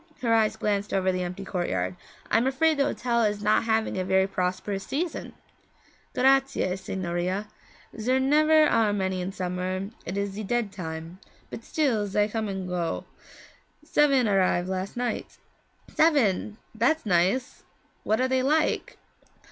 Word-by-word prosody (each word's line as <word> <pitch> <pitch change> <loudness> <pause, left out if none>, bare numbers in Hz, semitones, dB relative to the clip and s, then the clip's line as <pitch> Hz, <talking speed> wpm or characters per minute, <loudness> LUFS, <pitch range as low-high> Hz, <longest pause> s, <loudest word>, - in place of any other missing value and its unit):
Her 230 -2 +3
eyes 220 -1 +3
glanced 205 -2 -1
over 190 -1 +2
the 185 0 -2
empty 180 +2 -5
courtyard. 95 - -2 0.4
'I - - +5
am 245 - +1
afraid 310 +4 +2
the 280 - +4
hotel 240 -4 0
is 210 -1 0
not 210 +2 +3
having 220 -3 0
a - - 0
very 190 +1 +3
prosperous 195 +1 -2
season.' 320 - -3 0.8
'Grazie, 270 -7 +2
signorina. 185 +1 -3 0.5
Zer 255 +4 +2
never 305 +3 +5
are 220 -7 +2
many 190 -2 -1
in 180 +2 -3
summer; 185 +1 -3
it 185 +3 -5
is 200 0 -1
ze 205 +3 -6
dead 230 0 -1
time, 165 -1 -7 0.3
but 225 - -7
still 240 -10 0
zay 205 +1 +1
come 220 0 -3
and 190 -2 -4
zay - - -6
go. 175 -2 -2 0.8
Seven 280 -5 +3
arrive 185 -3 +2
last 190 +3 -4
night.' 245 0 -3 0.6
'Seven! 225 - +2 0.2
That's 245 +8 +1
nice. 190 +7 +1 0.4
What 215 - +1
are 255 - +2
they 260 0 +1
like?' 305 +4 0
205 Hz, 155 wpm, -26 LUFS, 185-250 Hz, 0.8 s, I